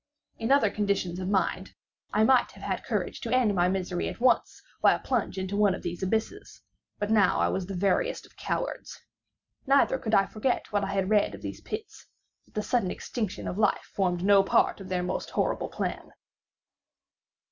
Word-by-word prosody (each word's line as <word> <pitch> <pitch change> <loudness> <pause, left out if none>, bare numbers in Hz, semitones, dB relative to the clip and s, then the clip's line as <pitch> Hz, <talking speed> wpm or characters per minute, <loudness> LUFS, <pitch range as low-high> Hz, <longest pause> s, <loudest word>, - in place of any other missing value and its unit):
In 225 +3 -1
other 275 -7 +4
conditions 200 -4 -1
of 185 0 -3
mind 190 -1 -1 0.4
I 215 - +3
might 255 +2 +4
have - - -13
had - - -2
courage - - -3
to 230 - -4
end 250 -5 +3
my 180 -1 +2
misery 185 -1 -2
at - - -8
once 245 0 +2 0.2
by - - +6
a - - -6
plunge 240 -6 -1
into 190 +1 -3
one 205 -2 +3
of - - -10
these 175 -1 -4
abysses; 220 - -3 0.3
but 205 +1 -2
now 215 -2 +4
I - - +2
was 190 -2 -2
the 195 - -5
veriest 340 - 0
of - - -22
cowards. - - -4 0.7
Neither 275 -1 +4
could 220 -3 0
I 195 - +5
forget 225 +4 -2
what 205 -1 +1
I 195 - -2
had 195 0 0
read 210 -1 +3
of - - -13
these - - -6
pits—that 430 0 -10
the 210 - -1
sudden 235 -6 +1
extinction 210 0 -4
of 185 - -4
life 210 -2 +1
formed 180 -3 0
no 200 0 +6
part 195 - +2
of 190 - -9
their 180 -1 -1
most 180 - -3
horrible - - -1
plan. - - -4
205 Hz, 190 wpm, -28 LUFS, 190-225 Hz, 0.7 s, by